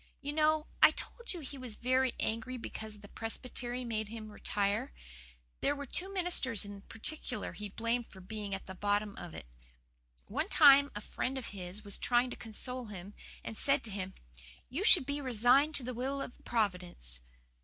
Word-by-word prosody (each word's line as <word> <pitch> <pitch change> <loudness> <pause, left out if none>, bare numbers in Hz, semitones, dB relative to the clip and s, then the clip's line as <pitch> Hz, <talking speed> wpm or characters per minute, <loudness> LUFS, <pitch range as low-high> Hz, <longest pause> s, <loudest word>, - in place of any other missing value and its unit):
"You 290 0 -4
know, 310 0 +3 0.2
I - - +11
told 475 0 -4
you 350 - -4
he 275 -1 -7
was 250 -4 -6
very 255 +1 +2
angry 230 +3 -2
because 220 -2 -6
the 205 - -11
Presbytery 245 +3 -3
made 220 -2 -2
him 215 0 -7
retire. 200 - 0 0.7
There 285 - +2
were 285 0 -5
two 370 +8 -3
ministers 340 - +2
in 205 -1 -8
particular 250 +5 -4
he 210 -1 -6
blamed 230 +3 -1
for 190 - -13
being 200 +1 -4
at 190 - -8
the 190 - -7
bottom 205 +1 0
of 175 - -8
it. - - -7 0.8
One 295 - -1
time 285 -2 +8
a 210 - -4
friend 260 +5 -2
of 260 - -4
his 190 +1 -5
was 200 - -2
trying 245 +1 +3
to - - -4
console 250 +3 0
him, 200 -2 -8 0.3
and 225 - -5
said 275 +5 +3
to 220 - -6
him, 190 -1 -4 0.5
"'You 290 +10 -2
should 365 -9 +7
be 285 +1 -2
resigned 260 +4 +4
to 265 - +3
the 250 +1 -3
will 265 +4 -2
of 245 - -7
Providence. 180 - -1
235 Hz, 185 wpm, -33 LUFS, 205-275 Hz, 0.8 s, I